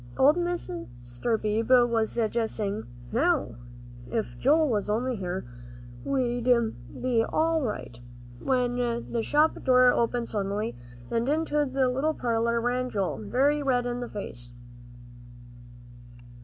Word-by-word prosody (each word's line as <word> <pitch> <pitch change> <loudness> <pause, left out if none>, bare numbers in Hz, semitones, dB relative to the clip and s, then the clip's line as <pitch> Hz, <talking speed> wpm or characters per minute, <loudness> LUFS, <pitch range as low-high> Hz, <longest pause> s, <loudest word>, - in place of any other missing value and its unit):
Old 285 +4 +6
Mr. 120 - -3
Beebe 225 +4 +3
was 230 -2 0
just 230 0 0
saying, 210 0 -3 0.2
"Now, 315 - +2 0.6
if 225 -2 -2
Joel 305 +4 +4
was 210 -5 -1
only 245 +4 0
here, 185 -2 -4 0.6
we'd 245 -3 -1 0.5
be 245 -3 +2
all 320 +5 +1
right," 210 - -4 0.4
when 250 -2 0 0.3
the 235 - 0
shop 300 +6 +2
door 255 -1 +6
opened 235 0 0
suddenly, 205 +2 -2 0.4
and 235 +3 0
into 300 -1 +1
the 265 -1 +2
little 275 +5 0
parlor 235 -1 0
ran 250 +2 0
Joel, 200 -5 -1
very 275 +8 +1
red 250 -3 +1
in 245 0 -2
the 245 -1 -5
face. 120 - -5
240 Hz, 125 wpm, -27 LUFS, 220-265 Hz, 0.6 s, Old